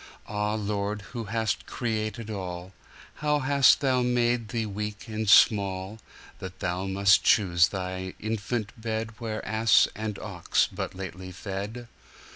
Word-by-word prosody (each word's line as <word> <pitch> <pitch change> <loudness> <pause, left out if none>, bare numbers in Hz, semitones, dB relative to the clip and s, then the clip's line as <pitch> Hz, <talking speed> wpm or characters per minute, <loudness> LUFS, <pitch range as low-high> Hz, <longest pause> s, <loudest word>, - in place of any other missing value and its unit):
Ah, 105 0 -1
Lord, 105 0 -2
who 115 -3 -4
hast 110 0 -2
created 110 -2 -3
all, 90 -2 -6 0.4
How 150 -1 +1
hast 140 0 +4
Thou 130 -3 +2
made 120 -1 +1
Thee 115 -1 -2
weak 105 +1 -5
and 110 -1 -2
small, 100 0 +4 0.4
That 95 0 -8
Thou 90 +2 -2
must 100 +1 +4
choose 90 -5 +4
Thy 95 -1 -5
infant 110 +1 -3
bedWhere 110 0 -3
ass 110 -1 +4
and 105 -1 -4
ox 95 -5 0
but - - -4
lately 95 -1 -7
fed! 100 +6 -6
105 Hz, 130 wpm, -27 LUFS, 95-115 Hz, 0.4 s, hast